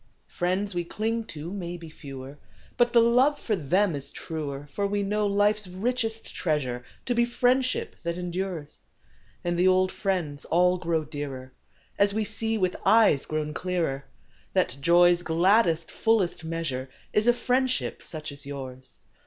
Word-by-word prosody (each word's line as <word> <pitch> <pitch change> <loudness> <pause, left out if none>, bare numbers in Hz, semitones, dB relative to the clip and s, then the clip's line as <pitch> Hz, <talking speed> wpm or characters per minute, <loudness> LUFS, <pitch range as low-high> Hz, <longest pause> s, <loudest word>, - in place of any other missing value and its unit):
Is - - -29
a - - -24
F - - -19 0.2
riends 205 0 -3
xv)e 175 -1 -2
clinq 225 +3 -2
to 155 +3 -7
mau 175 -3 -4
be 165 -1 -10
fe^Oer, 140 -2 -9 0.4
But 240 0 +3
the 235 - +6
loOe 250 +5 +4
jor 215 - -1
them 185 +4 +2
is 140 0 -5
truer; 145 -3 -5
fbr 200 -1 0
\Oe 205 0 0
know 210 +1 +1
life 205 +1 +3
s 210 -3 -7
richest 225 +4 -2
treasure 130 -7 -1 0.2
To 245 - +1
be 235 0 +3
friendship 250 +2 +1
that 170 0 -3
em 180 -1 -4
dures, 175 -5 -4 0.6
And 175 0 -1
the 180 - +5
old 185 0 +4
jriends 175 -8 -2
all 180 +1 +3
qroxO 165 -3 -1
dearer 135 -4 -6 0.2
& - - -29
As 200 0 +4
vOe 220 +1 0
see 220 +1 -1
\oith 185 -3 0
eues 215 -11 +5
qro\On 155 -1 -2
clearer 165 -7 -2 0.5
That 125 - +1
joq's 175 +2 +5
gladdest, 170 0 +3
fullest 220 -8 +1
measure 160 -6 -3
' - - -32
Is 215 +2 +2
a - - +8
friendship 255 +1 0
such 155 -2 -6
as 140 0 -10
Ljours. 130 -2 -7
180 Hz, 180 wpm, -27 LUFS, 155-210 Hz, 0.6 s, a